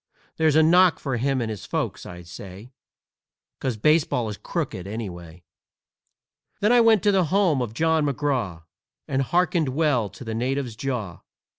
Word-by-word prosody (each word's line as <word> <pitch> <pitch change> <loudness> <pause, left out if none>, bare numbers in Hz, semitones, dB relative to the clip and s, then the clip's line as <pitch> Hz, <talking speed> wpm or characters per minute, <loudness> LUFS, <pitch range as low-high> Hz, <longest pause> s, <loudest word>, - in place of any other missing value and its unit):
That's 160 -2 +3
a 160 - +6
knock 175 +2 +5
for 135 -4 -3
him 135 +2 0
and 110 -2 -2
his 105 - -7
folks, - - -3
I 90 -1 -9
say, 95 +6 -11 0.9
'Cause 130 -5 -2
baseball 140 -3 +2
is 105 - -6
crooked, 95 0 -4
anyway!" 90 -6 -7 1.2
Then 210 +3 +2
I 245 -1 +6
went 225 -3 +4
to 205 - +4
the 190 -3 +3
home 175 -5 +2
of 115 -2 -4
John 160 0 +2
McGraw, 130 - -2 0.4
And 135 -3 0
hearkened 170 +1 +1
well 130 -6 +1
to - - -12
the 115 -2 -5
natives' 125 +1 -2
jaw. 115 -8 -4
130 Hz, 160 wpm, -24 LUFS, 110-160 Hz, 1.2 s, a